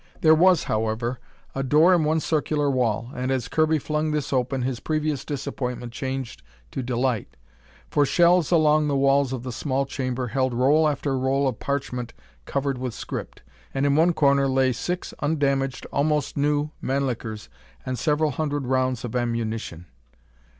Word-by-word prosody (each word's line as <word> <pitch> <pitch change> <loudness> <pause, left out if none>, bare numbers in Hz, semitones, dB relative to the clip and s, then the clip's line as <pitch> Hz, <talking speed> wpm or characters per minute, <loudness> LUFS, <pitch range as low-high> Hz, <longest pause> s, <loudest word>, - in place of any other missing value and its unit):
There 160 -1 +6
was, 180 +1 +5
however, 110 +3 -1 0.3
a 135 - -2
door 150 +7 +5
in 170 -3 +3
one 155 +1 +2
circular 150 -2 0
wall, 120 -2 0
and 125 +1 -3
as 130 -3 -1
Kirby 155 0 +2
flung 150 +1 -1
this 150 -2 -2
open, 130 0 0
his 125 -1 -2
previous 155 -1 -1
disappointment 125 -4 -4
changed 130 -1 -4 0.3
to - - -3
delight. 125 -2 -1 0.6
For 145 - +3
shelves 175 +2 +4
along 155 -3 +4
the 145 - 0
walls 135 -1 +3
of 130 -2 -4
the 130 - -4
small 135 +2 -1
chamber 130 -2 -3
held 130 +1 0
roll 145 +6 +4
after 140 -1 -1
roll 135 +2 +1
of 125 -5 -3
parchment 125 -4 -3 0.3
covered 140 -2 -2
with 125 -3 -4
script. - - -7 0.3
And 135 +1 +1
in 140 0 +3
one 165 +3 +4
corner 140 -3 +3
lay 130 0 +3
six 180 +8 -4
undamaged, 140 -3 0
almost 150 0 0
new 145 +1 +1
Mannlichers 120 -6 -2 0.4
and 130 -2 -3
several 150 +3 +1
hundred 145 -1 -2
rounds 130 -1 0
of 120 - -6
ammunition! 115 -7 -2
135 Hz, 160 wpm, -24 LUFS, 125-150 Hz, 0.6 s, There